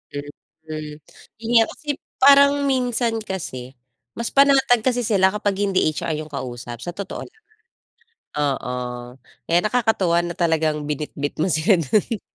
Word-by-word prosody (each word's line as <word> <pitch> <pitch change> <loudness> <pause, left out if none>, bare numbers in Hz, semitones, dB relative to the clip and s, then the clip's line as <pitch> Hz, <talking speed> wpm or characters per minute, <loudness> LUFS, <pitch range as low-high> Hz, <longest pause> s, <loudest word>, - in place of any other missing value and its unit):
Mhm, 155 +1 -8 0.5
'yun 230 - -5
nga, - - +6
okey, 295 -1 -4 0.3
parang 280 +1 +7 0.2
minsan 245 -3 0
kasi 145 - -6 0.4
mas 235 0 -3
panatag 270 -4 +4
kasi 245 -1 +2
sila 195 -4 +2
kapag 205 -2 -1
hindi 195 -2 +1
HR 155 +1 -3
'yung 155 0 -5
kausap, 120 -3 -6
sa 175 - -5
totoo 200 +1 -6
lang. 440 -2 -21 1.0
Oo, 140 -3 -1 0.8
kaya 170 - +5
nakakatuwa 215 -7 +2
na 175 0 -4
talagang 160 -3 0
binitbit 145 -1 -4
mo 185 - +1
sila 160 +5 +3
do'n. 205 - 0
185 Hz, 135 wpm, -22 LUFS, 150-235 Hz, 1.0 s, parang